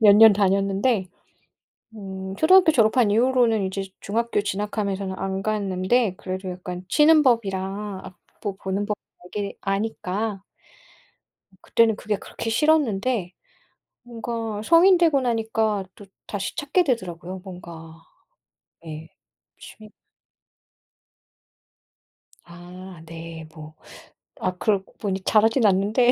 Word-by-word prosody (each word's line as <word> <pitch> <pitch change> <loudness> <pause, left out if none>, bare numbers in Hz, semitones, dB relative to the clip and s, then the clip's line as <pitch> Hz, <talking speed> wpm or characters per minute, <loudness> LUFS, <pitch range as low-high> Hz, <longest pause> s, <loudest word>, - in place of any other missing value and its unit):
몇 205 -1 +8
년 220 0 +9
다녔는데 195 +2 +1 0.9
음 190 -1 -7
초등학교 355 +1 +6
졸업한 225 -3 +3
이후로는 235 -1 +3
이제 190 +1 -3 0.2
중학교 230 +1 -1
진학하면서는 200 -1 -3
안 195 0 -3
갔는데 205 +1 0
그래도 185 0 -5
약간 180 0 -7
치는 305 +7 +5
법이랑 200 -4 -1
악보 190 +2 -8
보는 195 +2 -1
법 210 0 -2 0.4
대개 205 -1 -3
아니까 200 0 -2 1.2
그때는 225 -2 +2
그게 210 0 -2
그렇게 225 - -6
싫었는데 235 - +1 0.7
뭔가 230 -3 -5
성인 345 - +6
되고 320 -6 +3
나니까 220 -4 0
또 205 - -14 0.2
다시 200 -1 -4
찾게 320 +4 +1
되더라고요. 185 - -3
뭔가 170 -3 -10 0.9
네. 160 0 -8 0.5
취 215 -1 -13 2.5
아 180 +1 -12
네 165 0 -9
뭐 155 -1 -11 0.7
아, 185 - -2
그러고 200 -1 -1
보니 195 -2 -2
잘하진 225 +4 +3
않는데 210 +6 +3
205 Hz, 235 characters per minute, -23 LUFS, 190-230 Hz, 2.5 s, 년